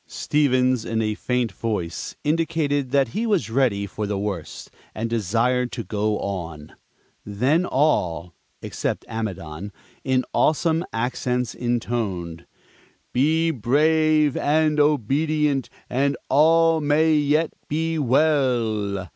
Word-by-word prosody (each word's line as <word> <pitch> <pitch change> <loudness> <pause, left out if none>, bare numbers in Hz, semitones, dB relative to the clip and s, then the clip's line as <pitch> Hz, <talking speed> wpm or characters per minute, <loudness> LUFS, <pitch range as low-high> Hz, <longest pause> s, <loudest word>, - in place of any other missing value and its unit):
Stevens, 130 -4 +1
in 115 0 -2
a 110 -1 0
faint 125 0 -1
voice, 95 -4 -4
indicated 150 -3 0
that 135 -2 +2
he 225 - -2
was 195 - 0
ready 115 -6 +1
for 105 +1 -5
the 100 -1 -2
worst, 100 -5 -5 0.2
and 110 +1 -2
desired 115 +3 0
to - - -4
go 105 0 -1
on. 85 -6 -6 0.5
Then 130 - +1
all 90 - 0 0.3
(except - - -3
Amidon) 100 -4 -5 0.3
in 130 -1 +1
awesome 160 +2 +2
accents 125 +1 -2
intoned, 110 -9 -3 0.7
"Be 160 +5 +2
brave 155 +3 +2
and 155 0 +1
obedient, 145 0 +1 0.2
and 140 +3 0
all 165 +2 +4
may 155 +2 +3
yet 150 +2 +2 0.2
be 160 +1 -1
well!" 120 -9 +1
125 Hz, 115 wpm, -23 LUFS, 110-150 Hz, 0.7 s, all